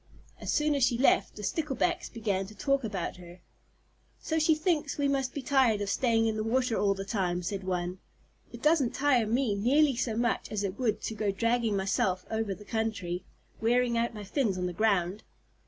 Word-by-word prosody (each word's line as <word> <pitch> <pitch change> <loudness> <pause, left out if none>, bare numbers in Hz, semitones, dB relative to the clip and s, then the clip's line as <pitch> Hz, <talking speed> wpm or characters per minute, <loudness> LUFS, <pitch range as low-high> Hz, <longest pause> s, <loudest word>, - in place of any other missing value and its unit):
As - - -3
soon 300 0 +2
as 280 -2 +1
she 240 -1 +3
left, 265 - +3
the 210 - -8
Sticklebacks 315 - -1
began 200 -4 -2
to 215 - -13
talk 275 +5 0
about 195 -5 -3
her. 175 0 -12 0.8
"So 320 0 -1
she 315 0 +4
thinks 310 -2 0
we 285 -1 +1
must 270 -2 0
be 285 - -4
tired 260 -6 +3
of 200 -1 -2
staying 230 -2 +2
in 220 -1 0
the 215 - -1
water 245 +1 +1
all 200 -1 +2
the 195 0 -5
time," 180 -4 -1
said 195 +2 -3
one. 180 0 -2 0.5
"It - - -11
doesn't 300 -6 +3
tire 260 -5 +3
me 235 0 +1
nearly 265 +7 +3
so 230 -2 -1
much 235 -1 0
as 210 -1 -2
it 195 0 -4
would 225 -5 0
to - - -3
go 210 -1 -1
dragging 230 +1 +1
myself 190 -1 0
over 220 -3 -1
the 210 - -14
country, 210 -6 -2 0.4
wearing 240 +1 +2
out 230 0 0
my 210 - -6
fins 205 -1 0
on 180 - -2
the 180 - -3
ground." 195 0 +1
225 Hz, 205 wpm, -29 LUFS, 195-260 Hz, 0.8 s, she